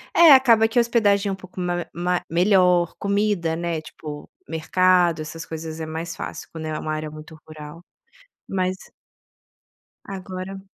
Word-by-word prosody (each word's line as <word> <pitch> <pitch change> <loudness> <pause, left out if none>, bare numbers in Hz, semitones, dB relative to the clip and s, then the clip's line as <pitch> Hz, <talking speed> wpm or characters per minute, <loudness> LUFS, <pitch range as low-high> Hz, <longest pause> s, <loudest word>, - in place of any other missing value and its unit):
É, 335 -2 +8
acaba 235 -5 +6
que 225 - -4
a - - +7
hospedagem 210 -4 +2
é - - -1
um - - -2
pouco 185 -1 -12
ma 175 -1 -2
ma 175 +1 -1
melhor, 180 -1 +3
comida, 200 -5 0
né, 170 -1 -3
tipo, 150 -1 -9 0.2
mercado 175 +1 +2
essas 165 +1 -7
coisas 160 0 -7
é 160 - -4
mais 160 +1 -5
fácil - - -7
quando 160 -1 -7
é 155 0 -3
uma 155 - -3
área 155 0 -4
muito 155 +1 -11
rural, 155 +2 -10 0.6
mas 185 -1 -1 1.3
Agora 190 0 -7
175 Hz, 155 wpm, -23 LUFS, 160-195 Hz, 1.3 s, É